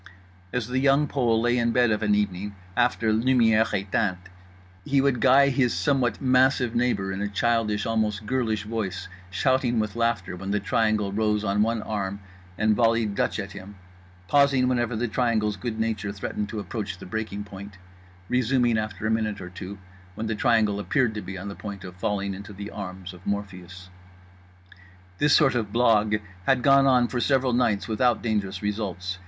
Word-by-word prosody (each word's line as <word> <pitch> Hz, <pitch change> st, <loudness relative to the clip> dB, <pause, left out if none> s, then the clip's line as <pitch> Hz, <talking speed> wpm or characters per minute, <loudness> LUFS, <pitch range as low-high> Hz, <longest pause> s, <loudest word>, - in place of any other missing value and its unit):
As 125 Hz, -3 st, -2 dB
The 125 Hz, +1 st, -1 dB
Young 140 Hz, +2 st, +3 dB
Pole 120 Hz, -5 st, +1 dB
lay 120 Hz, +1 st, +2 dB
in 115 Hz, 0 st, +1 dB
bed 120 Hz, -2 st, +3 dB
of 105 Hz, -, 0 dB
an 105 Hz, -1 st, +2 dB
evening 100 Hz, 0 st, -2 dB, 0.2 s
after 115 Hz, -2 st, +2 dB
lumières 115 Hz, -1 st, +3 dB, 0.2 s
éteintes, 95 Hz, -1 st, 0 dB, 0.7 s
he 140 Hz, +5 st, +1 dB
would 135 Hz, -3 st, +1 dB
guy 140 Hz, +2 st, +6 dB
his 125 Hz, -2 st, +1 dB
somewhat 130 Hz, -6 st, +1 dB
massive 130 Hz, -2 st, +3 dB
neighbour 115 Hz, -6 st, 0 dB
in 95 Hz, +1 st, -4 dB
a 105 Hz, -, -1 dB
childish 105 Hz, 0 st, 0 dB
almost 110 Hz, -2 st, -1 dB
girlish 115 Hz, -4 st, -1 dB
voice, 105 Hz, -4 st, -4 dB, 0.2 s
shouting 125 Hz, +3 st, +1 dB
with 110 Hz, -1 st, -2 dB
laughter 115 Hz, -6 st, -1 dB
when 95 Hz, +2 st, -7 dB
The 105 Hz, +1 st, +1 dB
Triangle 105 Hz, 0 st, 0 dB
rose 105 Hz, 0 st, 0 dB
on 100 Hz, 0 st, +1 dB
one 115 Hz, 0 st, 0 dB
arm 100 Hz, -2 st, -3 dB, 0.4 s
and 110 Hz, 0 st, +2 dB
volleyed 115 Hz, -1 st, +2 dB
Dutch -, -, -1 dB
at 100 Hz, -2 st, -5 dB
him, 100 Hz, +1 st, -10 dB, 0.5 s
pausing 140 Hz, -1 st, +4 dB
whenever 120 Hz, -2 st, 0 dB
The 120 Hz, +2 st, -1 dB
Triangle's 110 Hz, -2 st, 0 dB
good 110 Hz, +3 st, -5 dB
nature 110 Hz, -3 st, -1 dB
threatened 105 Hz, +1 st, -4 dB
to 110 Hz, -, -4 dB
approach 100 Hz, -3 st, -5 dB
the -, -, -11 dB
breaking 105 Hz, +1 st, -4 dB
point, 100 Hz, -1 st, -10 dB, 0.5 s
resuming 125 Hz, -1 st, +2 dB
after 110 Hz, 0 st, -5 dB
a 110 Hz, -, +1 dB
minute 110 Hz, -2 st, -1 dB
or 90 Hz, -1 st, -8 dB
two 95 Hz, +2 st, -8 dB, 0.4 s
when 110 Hz, -, -4 dB
The 110 Hz, -, -1 dB
Triangle 105 Hz, -1 st, +2 dB
appeared 120 Hz, +2 st, +1 dB
to 105 Hz, -, -5 dB
be 95 Hz, -1 st, -7 dB
on 95 Hz, +3 st, -7 dB
the 100 Hz, -, -5 dB
point 100 Hz, -2 st, -8 dB
of 90 Hz, -1 st, -9 dB
falling 100 Hz, 0 st, -2 dB
into 100 Hz, +2 st, -9 dB
the 100 Hz, +1 st, -7 dB
arms 95 Hz, -2 st, -7 dB
of 90 Hz, +1 st, -14 dB
Morpheus. 95 Hz, -2 st, -5 dB, 1.3 s
This 145 Hz, 0 st, +4 dB
sort 135 Hz, -3 st, +4 dB
of 110 Hz, -5 st, -2 dB
blague 105 Hz, -3 st, +2 dB, 0.2 s
had 130 Hz, -2 st, +3 dB
gone 135 Hz, 0 st, +5 dB
on 125 Hz, -2 st, +4 dB
for 125 Hz, -, -3 dB
several 130 Hz, 0 st, +2 dB
nights 115 Hz, -5 st, +1 dB
without 115 Hz, +1 st, +1 dB
dangerous 100 Hz, -4 st, -2 dB
results. 95 Hz, -3 st, -3 dB
110 Hz, 180 wpm, -25 LUFS, 100-120 Hz, 1.3 s, guy